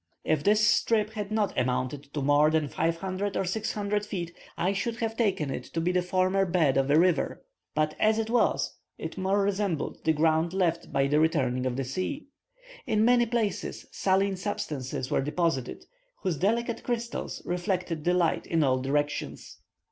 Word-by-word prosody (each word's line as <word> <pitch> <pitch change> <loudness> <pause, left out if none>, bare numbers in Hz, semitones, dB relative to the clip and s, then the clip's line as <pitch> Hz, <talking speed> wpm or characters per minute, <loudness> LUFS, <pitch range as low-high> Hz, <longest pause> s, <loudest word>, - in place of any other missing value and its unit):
If 155 -2 +1
this 210 +2 +4
strip 220 -1 +2
had 210 -2 -4
not 215 -2 0
amounted 130 +3 -1
to 145 - -1
more 145 +2 +5
than 155 -1 +1
500 185 +6 -1
or 195 - 0
600 205 +1 -1
feet, 175 -5 -5 0.2
I 185 +3 +1
should 225 +4 -2
have 225 -1 -2
taken 195 - 0
it 125 - -4
to - - +1
be 170 +2 +1
the 180 0 +2
former 185 +2 +1
bed 170 -7 +2
of 135 0 +2
a 145 - +5
river; 180 -1 +1 0.3
but 155 0 +1
as 215 0 +3
it 225 -1 -1
was, 240 +1 +1 0.2
it - - -6
more 195 +1 +1
resembled 195 -5 -1
the 160 - +3
ground 160 +2 +2
left 175 -3 0
by 135 -1 +2
the 145 +2 +2
returning 130 -6 +1
of 125 - -2
the 135 - -1
sea. 185 - -3 0.6
In 215 0 +3
many 240 0 +4
places 225 -3 -2
saline 195 0 +1
substances 140 -9 -4
were - - +2
deposited, 150 -3 -1 0.4
whose 180 -6 0
delicate 230 +6 0
crystals 235 -1 -3
reflected 180 -3 -2
the 180 +2 +2
light 170 -3 +1
in 165 -2 +2
all 130 -2 +2
directions. 145 +2 -2
180 Hz, 175 wpm, -28 LUFS, 150-205 Hz, 0.6 s, more